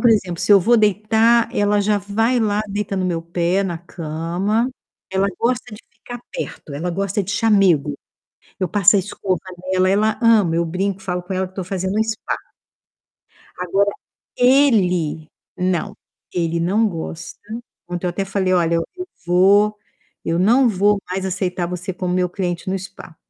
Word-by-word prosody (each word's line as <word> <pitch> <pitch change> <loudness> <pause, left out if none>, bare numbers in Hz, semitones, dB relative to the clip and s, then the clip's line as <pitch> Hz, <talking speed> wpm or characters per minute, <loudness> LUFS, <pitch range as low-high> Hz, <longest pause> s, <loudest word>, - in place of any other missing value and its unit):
por 240 - +5
exemplo, 185 -6 +1
se - - +4
eu 200 - +8
vou 235 +7 +4
deitar, 220 +2 +3
ela 205 0 +2
já 205 0 +2
vai 225 +5 0
lá, 210 -1 +1
deita 200 0 -3
no 185 - 0
meu 170 -2 -2
pé, 175 +3 0
na 175 -4 -3
cama. 175 +7 -2 0.4
Ela 190 +1 +1
gosta 245 -1 -1
de 210 - -12
ficar 245 -1 -9
perto, 145 - -6
ela 170 +5 -3
gosta 195 +3 -1
de 195 - -5
chamego. 195 - +3 0.7
Eu 185 - 0
passo 200 +2 +5
a - - +4
escova 190 -1 -2 0.3
nela, 185 0 +3
ela 215 +2 +2
ama. 210 -8 +4
Eu 170 - +2
brinco, 190 +3 -2
falo 180 -2 -3
com 180 - -7
ela 190 0 -1
que 185 - -24
tô 190 - -4
fazendo 190 +1 -2
um - - +4
spa. 220 0 -3 1.2
Agora, 195 +3 +1 0.5
ele 195 - +3 0.3
não. 180 -1 -1 0.4
Ele 170 -1 -1
não 205 +6 +2
gosta. 165 -2 -7 0.5
Ontem, 175 +1 -3
eu - - +1
até 195 +3 -2
falei: 195 -1 0
"Olha, 170 -2 +2
eu 165 - -1 0.4
vou 200 +4 +4 0.5
eu 165 - 0
não 235 +7 +4
vou 205 0 +2
mais 190 +1 -2
aceitar 180 -1 -2
você 180 +2 -4
como 180 0 -2
meu 180 0 +1
cliente 175 -1 -3
no 195 - -1
spa". 190 -3 -11
190 Hz, 170 wpm, -20 LUFS, 175-210 Hz, 1.2 s, eu